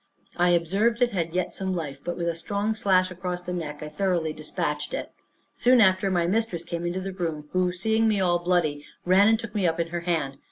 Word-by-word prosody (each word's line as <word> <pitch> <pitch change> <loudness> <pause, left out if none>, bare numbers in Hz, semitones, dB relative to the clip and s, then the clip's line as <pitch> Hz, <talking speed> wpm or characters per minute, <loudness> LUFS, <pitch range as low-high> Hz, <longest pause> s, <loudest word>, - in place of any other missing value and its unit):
I 175 0 +3
observed 195 +7 +2
it 240 - +2
had 170 -4 -2
yet 185 - -1
some 190 -1 -2
life, 145 -5 -5
but 175 - -3
with 170 - -2
a 170 - +1
strong 200 +6 -2
slash 185 -3 +2
across 180 0 -4
the 180 - -4
neck, 155 -4 -5
I - - -5
thoroughly 165 0 -1
despatched 150 -1 -3
it. - - -5 0.4
Soon 250 0 +4
after, 190 -2 +4
my 175 -2 +1
mistress 185 -2 0
came 170 0 -4
into 180 +2 -2
the 195 0 -5
room, 160 -5 -4
who 185 -1 +1
seeing 220 +5 +1
me 210 -2 +2
all 175 -2 +2
bloody, 170 -5 0 0.2
ran 190 +3 +5
and 225 0 +5
took 230 -1 -8
me 200 -4 +1
up 165 0 -1
in 165 0 -1
her 175 0 -3
hand. 160 -6 -2
180 Hz, 230 wpm, -26 LUFS, 165-195 Hz, 0.4 s, ran